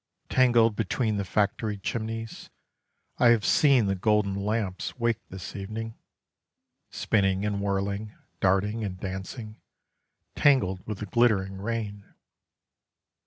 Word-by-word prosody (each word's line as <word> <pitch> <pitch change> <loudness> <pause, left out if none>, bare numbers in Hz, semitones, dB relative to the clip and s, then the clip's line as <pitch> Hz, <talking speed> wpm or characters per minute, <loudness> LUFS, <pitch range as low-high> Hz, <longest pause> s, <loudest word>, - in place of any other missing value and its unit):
Tangled 120 -4 +4
between 110 +1 0
the 100 - -1
factory 105 +2 0
chimneys, 115 +2 -5 0.7
I 120 - +6
have 115 -4 +4
seen 135 -7 +5
the 100 - +1
golden 105 +1 +1
lamps 100 0 -2
wake 115 -2 +1
this 95 -1 -8
evening: 110 +3 -5 1.0
Spinning 95 -1 +1
and 100 -1 -1
whirling, 100 +1 -2 0.3
darting 100 +4 +1
and 95 -3 -4
dancing, 100 +4 -6 0.7
Tangled 105 -11 +3
with 105 -2 -3
the - - -2
glittering 100 -3 +2
rain. 105 -2 -4
105 Hz, 115 wpm, -27 LUFS, 100-115 Hz, 1.0 s, I